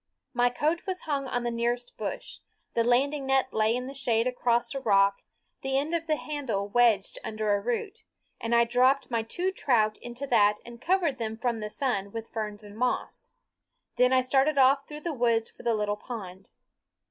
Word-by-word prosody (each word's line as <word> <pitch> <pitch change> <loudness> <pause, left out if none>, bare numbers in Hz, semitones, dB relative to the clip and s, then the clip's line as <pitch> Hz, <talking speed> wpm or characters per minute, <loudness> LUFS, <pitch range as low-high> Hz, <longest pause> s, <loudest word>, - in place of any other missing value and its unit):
My 245 -1 +3
coat 310 +9 -1
was 370 -1 -2
hung 280 -3 -2
on 245 -1 -1
the 240 - -1
nearest 240 +1 -2
bush; - - -6 0.3
the 230 - +2
landing 270 +4 +1
net 265 -1 +2
lay 220 +1 +2
in 250 0 -3
the 270 - -7
shade 240 -4 +1
across 245 -1 +1
a 275 - -3
rock, 200 -5 +3 0.4
the 270 0 0
end 295 +4 -1
of 330 -1 -1
the 310 - +2
handle 270 -11 -3
wedged 225 -3 +2
under 215 -1 -1
a 200 - +1
root, 245 - -3 0.4
and 230 +1 0
I 235 - +6
dropped 255 +3 +2
my 230 -1 +1
two 350 +12 -2
trout 220 - +1
into 240 +3 -6
that 210 -5 +3
and 235 0 -11
covered 340 -7 +1
them 220 -1 -3
from 235 -1 -1
the 210 0 -4
sun 210 -6 -1
with 225 0 -6
ferns 210 -1 -4
and 205 0 -12
moss. 250 - -2 0.6
Then 250 0 +4
I 260 0 +5
started 270 +3 +2
off 275 +1 +4
through 300 0 -8
the 335 -1 -3
woods 235 -3 +1
for - - -15
the 235 -1 +1
little 210 -1 -1
pond. 195 -6 -8
245 Hz, 195 wpm, -28 LUFS, 220-270 Hz, 0.6 s, I